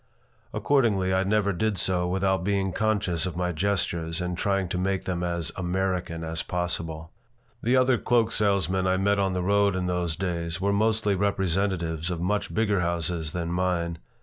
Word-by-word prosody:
Accordingly, 105 -10 +2
I 95 0 +2
never 100 0 +1
did 105 +2 0
so 90 0 +1
without 95 0 +1
being 95 -1 0
conscious 95 -5 0
of 90 -2 -5
my 90 0 0
gestures 85 -2 -1
and 90 0 -2
trying 100 +1 0
to 90 - -2
make 95 0 -1
them 90 -2 -2
as 85 -2 -1
"American" 90 -2 -2
as 80 0 -2
possible 80 -3 -3 0.5
The 125 +3 +3
other 130 -1 +3
cloak 120 -2 +2
salesmen 95 -3 +1
I 95 0 +2
met 100 +1 +2
on 95 -1 +1
the 90 -1 -1
road 100 0 +3
in 90 -1 -1
those 90 -2 -1
days 85 -1 -2
were 100 +2 +1
mostly 110 0 +2
representatives 95 -4 0
of 90 -2 -3
much 100 +4 -1
bigger 105 -3 +1
houses 85 -2 -1
than 85 -1 -2
mine. 85 -2 -1
95 Hz, 175 wpm, -26 LUFS, 85-100 Hz, 0.5 s, The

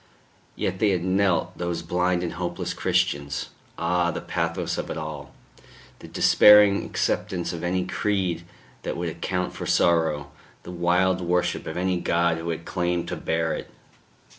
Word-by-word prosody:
Yet 95 0 -2
they 105 - +3
had 90 -3 0
knelt, 95 -1 +1
those 85 -1 -2
blind 90 +1 0
and 85 - -3
hopeless 85 0 -3
Christians.... 70 -1 -1 0.3
Ah! 85 +1 +1
the 85 - -3
pathos 85 -1 -2
of - - -4
it - - -4
all, 75 -3 -6 0.7
the - - -11
despairing 105 -1 +6
acceptance 90 -2 -2
of 85 - -6
any 90 +1 0
creed 90 -3 -1 0.4
that - - -4
would 85 0 -2
account 90 +2 -3
for - - -6
sorrow, 80 -4 +2 0.3
the - - -8
wild 90 +1 +2
worship 90 0 0
of 80 - -5
any 90 0 0
God 85 -1 +1
who 85 +1 -5
had 85 0 -4
claimed 85 -1 -1
to - - -3
bear 80 0 -1
it! - - -6
85 Hz, 160 wpm, -25 LUFS, 85-90 Hz, 0.7 s, despairing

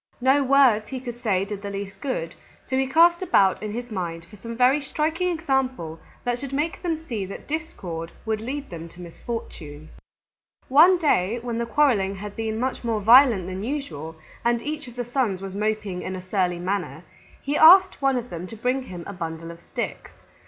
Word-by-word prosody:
No 265 +3 +4
words 260 -6 +4
he 265 - -5
could 240 -1 -8
say 195 -4 +1
did 205 -1 -6
the 200 - -5
least 195 -1 -6
good, 255 - -3 0.3
so 260 - -3
he 265 0 +1
cast 340 +5 +5
about 195 - +3
in 215 -1 -4
his 240 +2 -6
mind 170 -4 -4
for 200 +5 -15
some 230 +3 -8
very 255 +4 +4
striking 315 +5 -1
example 265 - -1 0.2
that 245 0 -1
should 275 0 -6
make 300 +4 -1
them 335 -3 -1
see 225 -9 -3
that 195 - -9
discord 180 - -5
would 220 -1 -1
lead 275 +3 -5
them 165 -1 -7
to 170 - -17
misfortune. 165 -5 -7 0.8
One 330 +7 +7
day 235 - +1
when 235 -1 -3
the 235 - -2
quarreling 230 -9 +2
had 205 +1 -8
been 220 -1 -3
much 255 +1 -2
more 230 -2 0
violent 230 -2 +6
than 185 +2 -5
usual 165 - -5 0.3
and 235 0 +2
each 300 -2 -4
of 240 - -11
the 245 -1 -3
Sons 245 -6 0
was 195 0 -7
moping 210 -3 -2
in 185 - -4
a 185 - -7
surly 185 -3 0
manner, 175 -4 -3 0.4
he 285 +1 -2
asked 370 +4 +7
one 270 -1 +2
of 245 0 -5
them 175 +1 -6
to 225 - -9
bring 250 +4 0
him 180 -5 -8
a 200 - -7
bundle 165 -2 -6
of 170 0 -13
sticks. - - -5
225 Hz, 200 wpm, -24 LUFS, 185-270 Hz, 0.8 s, One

